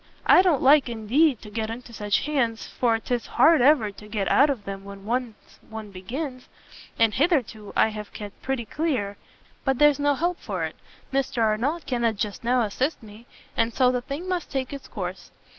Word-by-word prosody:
I -, -, +7 dB
don't 350 Hz, -7 st, +2 dB
like, 275 Hz, -1 st, +6 dB
indeed, 240 Hz, +5 st, +2 dB
to 210 Hz, -, -10 dB
get 220 Hz, 0 st, -2 dB
into 235 Hz, +1 st, -8 dB
such 205 Hz, -2 st, 0 dB
hands, 250 Hz, -7 st, 0 dB
for 235 Hz, -2 st, +1 dB
'tis 240 Hz, +1 st, -3 dB
hard 325 Hz, -4 st, +5 dB
ever 255 Hz, -6 st, +4 dB
to 210 Hz, +1 st, -13 dB
get 210 Hz, -2 st, -2 dB
out 285 Hz, +2 st, +5 dB
of 250 Hz, -8 st, -3 dB
them 195 Hz, 0 st, -6 dB
when 200 Hz, 0 st, -10 dB
once 240 Hz, -1 st, -4 dB
one 220 Hz, -2 st, -8 dB
begins, 255 Hz, -, -6 dB, 0.5 s
and 225 Hz, -2 st, +3 dB
hitherto 260 Hz, -, 0 dB
I -, -, +4 dB
have 210 Hz, -1 st, -7 dB
kept 205 Hz, -2 st, -9 dB
pretty 265 Hz, -3 st, -2 dB
clear. 240 Hz, -10 st, -2 dB, 0.5 s
But 270 Hz, -2 st, +1 dB
there's 295 Hz, 0 st, +5 dB
no 290 Hz, 0 st, +2 dB
help 345 Hz, +5 st, -1 dB
for -, -, -4 dB
it -, -, -4 dB, 0.4 s
Mr 265 Hz, -3 st, 0 dB
Arnott 245 Hz, +10 st, 0 dB
cannot 235 Hz, -3 st, 0 dB
just 205 Hz, +2 st, -4 dB
now 245 Hz, +1 st, +2 dB
assist 255 Hz, +7 st, -2 dB
me 215 Hz, +2 st, -13 dB, 0.3 s
and 230 Hz, 0 st, 0 dB
so 255 Hz, -2 st, +4 dB
the 250 Hz, -1 st, -1 dB
thing 280 Hz, +8 st, -6 dB
must 360 Hz, -3 st, -2 dB
take 265 Hz, -1 st, -3 dB
its 280 Hz, -, -8 dB
course. 180 Hz, -3 st, -6 dB
240 Hz, 190 wpm, -25 LUFS, 215-280 Hz, 0.5 s, I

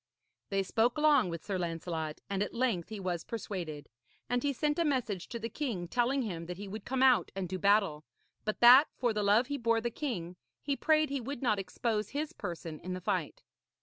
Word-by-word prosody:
They 195 Hz, -1 st, +1 dB
spoke 230 Hz, +6 st, +1 dB
long 295 Hz, -9 st, +4 dB
with 170 Hz, -1 st, -6 dB
Sir 195 Hz, -3 st, -2 dB
Lancelot, 165 Hz, -2 st, -3 dB
and 195 Hz, 0 st, -2 dB
at 205 Hz, -, -2 dB
length 230 Hz, -9 st, 0 dB
he 215 Hz, -2 st, -6 dB
was 180 Hz, -3 st, -2 dB
persuaded; 175 Hz, -, -5 dB, 0.4 s
and 245 Hz, 0 st, 0 dB
he 285 Hz, -, +1 dB
sent 295 Hz, +3 st, 0 dB
a -, -, +4 dB
message 245 Hz, -, -1 dB
to 235 Hz, -, -5 dB
the 230 Hz, 0 st, -4 dB
king 225 Hz, -7 st, -3 dB
telling 250 Hz, +6 st, +1 dB
him 170 Hz, -6 st, -5 dB
that 180 Hz, 0 st, -5 dB
he 200 Hz, +1 st, -7 dB
would 210 Hz, +1 st, -7 dB
come 265 Hz, +1 st, 0 dB
out 255 Hz, -2 st, +5 dB
and 190 Hz, -2 st, -2 dB
do 185 Hz, +1 st, -4 dB
battle; 200 Hz, -7 st, +3 dB, 0.4 s
but 215 Hz, -, -3 dB
that, 255 Hz, +5 st, +9 dB
for 240 Hz, -3 st, +1 dB
the 210 Hz, -, -1 dB
love 205 Hz, +4 st, +4 dB
he 285 Hz, +2 st, -3 dB
bore 230 Hz, -1 st, +2 dB
the 235 Hz, +1 st, -2 dB
king, 185 Hz, -, -4 dB, 0.2 s
he 280 Hz, -1 st, -1 dB
prayed 310 Hz, 0 st, +2 dB
he 280 Hz, -2 st, -1 dB
would 270 Hz, +2 st, -5 dB
not 215 Hz, -5 st, +2 dB
expose 210 Hz, +2 st, -2 dB
his 300 Hz, +3 st, -3 dB
person 170 Hz, -4 st, -6 dB
in 185 Hz, +1 st, -5 dB
the 185 Hz, -, -4 dB
fight. -, -, -2 dB
215 Hz, 215 wpm, -31 LUFS, 185-255 Hz, 0.4 s, that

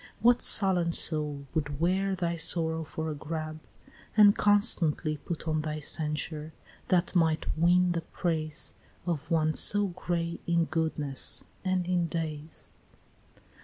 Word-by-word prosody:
what 240 Hz, +2 st, +3 dB
sullen 180 Hz, -5 st, +6 dB
soul 150 Hz, -4 st, -2 dB
would 145 Hz, -2 st, -3 dB
wear 190 Hz, +3 st, 0 dB
Thy 170 Hz, -2 st, -2 dB
sorrow 160 Hz, -1 st, 0 dB
for 160 Hz, 0 st, -5 dB
a -, -, -4 dB
garb, 155 Hz, +1 st, -6 dB, 0.6 s
and 205 Hz, -1 st, +7 dB
constantly 175 Hz, -7 st, +2 dB
Put 165 Hz, +2 st, -7 dB
on 155 Hz, -1 st, 0 dB
thy 155 Hz, 0 st, -4 dB
censure, 150 Hz, +1 st, -3 dB, 0.3 s
that 180 Hz, +1 st, 0 dB
might 160 Hz, -2 st, +1 dB
win 175 Hz, +2 st, +3 dB
the 170 Hz, -1 st, -2 dB
praise 160 Hz, -2 st, -2 dB, 0.3 s
Of 160 Hz, -3 st, -4 dB
one 155 Hz, -2 st, +1 dB
so 205 Hz, +3 st, +4 dB
gray 170 Hz, -1 st, -4 dB
in 170 Hz, -1 st, +1 dB
goodness 155 Hz, -5 st, -1 dB, 0.2 s
and 185 Hz, -2 st, -1 dB
in 175 Hz, -2 st, 0 dB
days? 155 Hz, -1 st, -5 dB
165 Hz, 130 wpm, -28 LUFS, 155-180 Hz, 0.6 s, and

